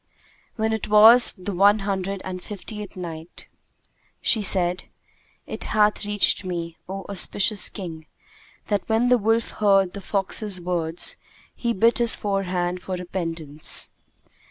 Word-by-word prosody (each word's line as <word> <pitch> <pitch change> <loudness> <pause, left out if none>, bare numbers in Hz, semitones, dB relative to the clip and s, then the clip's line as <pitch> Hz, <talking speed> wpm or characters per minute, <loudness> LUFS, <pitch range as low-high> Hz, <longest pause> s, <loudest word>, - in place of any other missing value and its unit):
When 220 0 -1
it 220 - -3
was 220 +4 +7
the 190 +2 -6
One 200 +3 +4
Hundred 195 -1 -3
and 185 -1 -6
Fiftieth 210 +1 -8
Night, 165 -2 -9 0.7
She 220 - +1
said, 180 -2 0 0.6
It - - -5
hath 210 -1 +1
reached 205 0 +3
me, 170 -2 -5
O 195 0 -6
auspicious 200 +1 +2
King, 165 -5 -8 0.6
that 205 0 -2
when 225 +3 +2
the 250 -1 +4
wolf 225 +2 0
heard 195 -3 +2
the 200 - -8
fox's 195 0 -1
words 175 - -2 0.4
he 235 - -2
bit 230 +3 +2
his 235 -1 +5
forehand 180 -3 -2
for 185 - -5
repentance. 165 -4 -3
195 Hz, 130 wpm, -23 LUFS, 180-210 Hz, 0.7 s, was